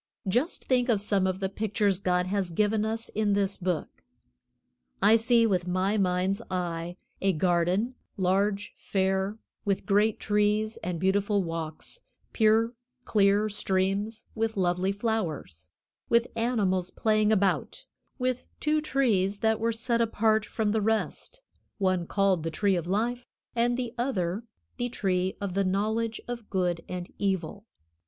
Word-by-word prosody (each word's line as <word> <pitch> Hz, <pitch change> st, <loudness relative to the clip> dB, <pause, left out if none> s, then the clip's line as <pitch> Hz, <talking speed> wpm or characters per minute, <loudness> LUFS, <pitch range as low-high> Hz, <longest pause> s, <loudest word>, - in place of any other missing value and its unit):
Just 245 Hz, -, 0 dB
think 250 Hz, -1 st, +2 dB
of 220 Hz, -4 st, +3 dB
some 200 Hz, -2 st, +1 dB
of 185 Hz, 0 st, -2 dB
the 190 Hz, -, 0 dB
pictures 200 Hz, -1 st, 0 dB
God 180 Hz, -2 st, +1 dB
has 190 Hz, -1 st, -1 dB
given 210 Hz, +4 st, +1 dB
us 225 Hz, +1 st, -3 dB
in 210 Hz, -1 st, 0 dB
this 200 Hz, -1 st, +1 dB
Book. 180 Hz, -3 st, -3 dB, 1.0 s
I 220 Hz, -, +6 dB
see, 230 Hz, +1 st, +4 dB
with 185 Hz, -5 st, +1 dB
my 185 Hz, +3 st, +1 dB
mind's 185 Hz, +1 st, +1 dB
eye, 175 Hz, -1 st, -3 dB, 0.2 s
a 195 Hz, 0 st, +3 dB
garden, 180 Hz, +7 st, +1 dB, 0.2 s
large, 195 Hz, +2 st, +1 dB
fair, 190 Hz, +1 st, 0 dB, 0.3 s
with 200 Hz, -2 st, -1 dB
great 210 Hz, +1 st, +2 dB
trees 210 Hz, +1 st, +1 dB
and 175 Hz, -1 st, -4 dB
beautiful 200 Hz, +2 st, +2 dB
walks, 165 Hz, -, -5 dB, 0.3 s
pure, 225 Hz, +1 st, +3 dB, 0.3 s
clear 205 Hz, 0 st, +3 dB
streams 200 Hz, +2 st, -1 dB
with 225 Hz, -1 st, -1 dB
lovely 180 Hz, +1 st, +1 dB
flowers, 180 Hz, -, -3 dB, 0.4 s
with 235 Hz, 0 st, +4 dB
animals 205 Hz, -6 st, +1 dB
playing 215 Hz, -1 st, +2 dB
about, 200 Hz, -, 0 dB, 0.3 s
with 255 Hz, -1 st, -1 dB
two 305 Hz, +1 st, +1 dB
trees 210 Hz, -9 st, +1 dB
that 220 Hz, -1 st, +2 dB
were 230 Hz, +1 st, +1 dB
set 235 Hz, +1 st, 0 dB
apart 220 Hz, -1 st, +2 dB
from 215 Hz, -2 st, -1 dB
the 220 Hz, 0 st, +1 dB
rest, 225 Hz, -, -2 dB, 0.4 s
one 185 Hz, -4 st, +1 dB
called 195 Hz, -4 st, +2 dB
the 165 Hz, -, -2 dB
Tree 195 Hz, +4 st, +1 dB
of 170 Hz, -1 st, -2 dB
Life 235 Hz, +6 st, -1 dB, 0.3 s
and 240 Hz, +1 st, +2 dB
the 245 Hz, -2 st, -3 dB
other 210 Hz, -4 st, -1 dB, 0.3 s
the 245 Hz, -1 st, -1 dB
Tree 185 Hz, -4 st, -1 dB
of 200 Hz, -3 st, -3 dB
the 195 Hz, +1 st, +1 dB
Knowledge 220 Hz, +4 st, 0 dB
of 240 Hz, -3 st, -6 dB
Good 175 Hz, -3 st, 0 dB
and 180 Hz, -1 st, -6 dB
Evil. 195 Hz, +1 st, -2 dB
200 Hz, 145 wpm, -28 LUFS, 185-225 Hz, 1.0 s, I